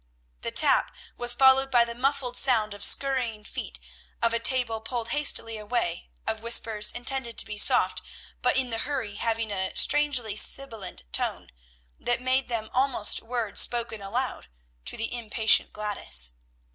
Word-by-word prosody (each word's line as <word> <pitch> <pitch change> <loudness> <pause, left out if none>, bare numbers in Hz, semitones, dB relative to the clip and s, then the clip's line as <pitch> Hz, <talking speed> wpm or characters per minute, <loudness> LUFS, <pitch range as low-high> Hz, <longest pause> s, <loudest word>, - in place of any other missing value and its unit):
The - - -3
tap - - +3 0.2
was 240 0 +1
followed 265 +1 +4
by 240 -2 +4
the 235 - -6
muffled 255 0 -2
sound 225 -6 +2
of 205 - -7
scurrying 250 -6 +1
feet, - - -7 0.4
of 230 0 +1
a 230 - +1
table 230 -2 +3
pulled 235 0 -5
hastily 230 -5 0
away, 210 -6 -3 0.2
of 220 0 -3
whispers 225 -2 +2
intended 245 -1 -4
to - - +4
be 210 -1 -5
soft, - - +4 0.4
but - - +2
in 255 -2 +1
the 225 - -2
hurry 230 -7 -4
having 225 -1 -2
a 190 -1 -3
strangely 260 -8 +4
sibilant 220 - -2
tone, - - -1 0.5
that 240 0 -1
made 255 +1 0
them 220 -2 -4
almost 255 -5 +1
words 235 -3 -1
spoken 235 -3 -2
aloud, 235 - -4 0.4
to - - -4
the 225 - -4
impatient 220 -1 +2
Gladys. 65 - -1
235 Hz, 155 wpm, -26 LUFS, 215-255 Hz, 0.5 s, followed